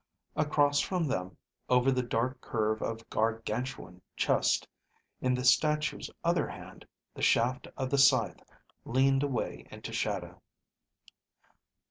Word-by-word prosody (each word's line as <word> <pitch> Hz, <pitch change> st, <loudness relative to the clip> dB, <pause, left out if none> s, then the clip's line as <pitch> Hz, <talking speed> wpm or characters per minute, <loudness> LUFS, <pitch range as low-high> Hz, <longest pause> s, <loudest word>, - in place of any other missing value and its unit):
Across 145 Hz, -1 st, +2 dB
from 180 Hz, +3 st, 0 dB
them, 95 Hz, -10 st, -3 dB, 0.3 s
over 125 Hz, +1 st, +4 dB
the 130 Hz, -1 st, +1 dB
dark 125 Hz, +1 st, -2 dB
curve 110 Hz, -1 st, -1 dB
of 115 Hz, 0 st, -4 dB
Gargantuan 110 Hz, -3 st, -2 dB, 0.2 s
chest, -, -, +2 dB, 0.5 s
in 130 Hz, 0 st, +2 dB
the 125 Hz, 0 st, -3 dB
statue's 150 Hz, +4 st, +2 dB
other -, -, +2 dB
hand, -, -, -11 dB, 0.3 s
the -, -, -9 dB
shaft 125 Hz, +3 st, +2 dB
of 130 Hz, -1 st, -2 dB
the 140 Hz, -, +2 dB
scythe 135 Hz, -, +4 dB, 0.4 s
leaned 135 Hz, +2 st, +2 dB
away 140 Hz, -3 st, -3 dB
into -, -, -8 dB
shadow. -, -, -3 dB
125 Hz, 120 wpm, -30 LUFS, 115-135 Hz, 0.5 s, over